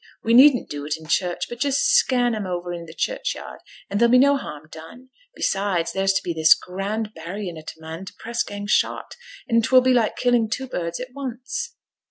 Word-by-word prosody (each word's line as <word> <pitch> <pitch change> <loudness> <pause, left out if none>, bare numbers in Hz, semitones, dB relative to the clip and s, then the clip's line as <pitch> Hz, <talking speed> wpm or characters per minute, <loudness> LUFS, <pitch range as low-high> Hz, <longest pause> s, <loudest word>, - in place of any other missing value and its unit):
We 230 - +1
needn't 255 0 +7
do 145 -1 -6
it 150 - -1
i' 160 - -13
church, 175 +2 0
but 240 - -8
just 280 - +1
scan 255 - +3
'em 210 -3 -3
o'er 175 -1 -4
i' 170 -1 -7
t' 160 - -11
churchyard, - - -3 0.3
and 200 - -2
there'll 235 0 +5
be 250 - +7
no 280 +2 +5
harm 155 - -7
done. 165 +12 -12 0.3
Besides, 195 - 0
there's 195 0 +1
to 195 - 0
be 175 - -2
this 160 -1 +6
grand 205 +4 -4
burryin' 175 +2 -6
o' 160 - -9
t' 155 - -9
man 160 +3 -8
t' - - -10
press 235 +1 -3
gang 205 0 -5
shot, 210 - 0 0.3
and 230 -2 +3
't - - -1
will 255 0 +8
be 255 0 +3
like 230 -3 +1
killing 245 -3 +2
two 265 +4 -3
birds 170 -8 -4
at 250 0 -7
once.' 270 - -5
215 Hz, 220 wpm, -23 LUFS, 175-255 Hz, 0.3 s, will